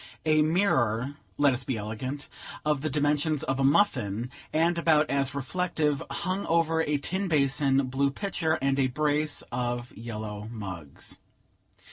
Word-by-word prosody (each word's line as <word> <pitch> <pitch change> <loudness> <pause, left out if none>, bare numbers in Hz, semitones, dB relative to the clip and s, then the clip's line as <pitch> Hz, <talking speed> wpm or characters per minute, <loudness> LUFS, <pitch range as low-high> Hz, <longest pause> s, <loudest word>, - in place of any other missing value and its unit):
A 155 -1 +4
mirror 140 - +2 0.2
(let 145 -2 +4
us 125 0 -1
be 125 -2 -2
elegant!) 115 +7 -5 0.4
of 150 -3 +1
the 155 - -1
dimensions 150 +1 +1
of 135 0 -1
a - - +2
muffin, 125 - +2 0.2
and 170 +2 +2
about 155 -2 +4
as 140 0 +1
reflective, 150 0 0
hung 190 +1 -2
over 165 -1 +2
a 150 -2 +1
tin 190 +7 -2
basin, 140 -3 +2
blue 135 +2 +1
pitcher, 165 0 -1
and 135 0 +2
a 135 - +4
brace 150 +2 0
of 120 0 -3
yellow 110 -2 -6
mugs. 90 -10 -7
140 Hz, 145 wpm, -28 LUFS, 125-155 Hz, 0.4 s, A